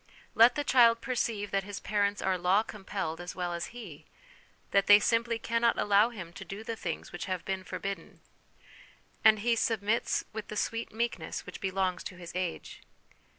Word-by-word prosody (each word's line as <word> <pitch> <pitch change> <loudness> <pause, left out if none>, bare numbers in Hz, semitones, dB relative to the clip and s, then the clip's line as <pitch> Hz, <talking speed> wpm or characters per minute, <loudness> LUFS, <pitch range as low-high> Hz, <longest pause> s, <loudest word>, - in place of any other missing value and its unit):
Let 235 +2 +6
the 290 - -1
child 235 -4 +5
perceive 230 -5 -2
that 195 0 +1
his 200 +1 -6
parents 205 -1 0
are 190 -1 +2
law 185 +4 +3
compelled 190 -6 -5
as 175 - -7
well 180 -1 -2
as 170 0 -3
he, 210 -12 -10 0.6
that 200 -1 +3
they 205 0 +9
simply 230 +1 +1
cannot 230 +1 +1
allow 205 +2 +4
him 185 -8 -9
to - - -8
do 200 +3 -7
the 230 +1 -4
things 170 -6 -5
which 175 - -5
have 185 -2 -3
been 190 -1 -3
forbidden, 195 +2 -6 1.0
and 215 -1 +6
he 235 +1 +2
submits 225 0 0
with 220 -1 -5
the 210 - -6
sweet 230 +2 -2
meekness 235 +2 -3
which - - -9
belongs 190 -1 -1
to 185 - -6
his 175 -1 -9
age. 180 -2 -4
205 Hz, 180 wpm, -30 LUFS, 185-230 Hz, 1.0 s, they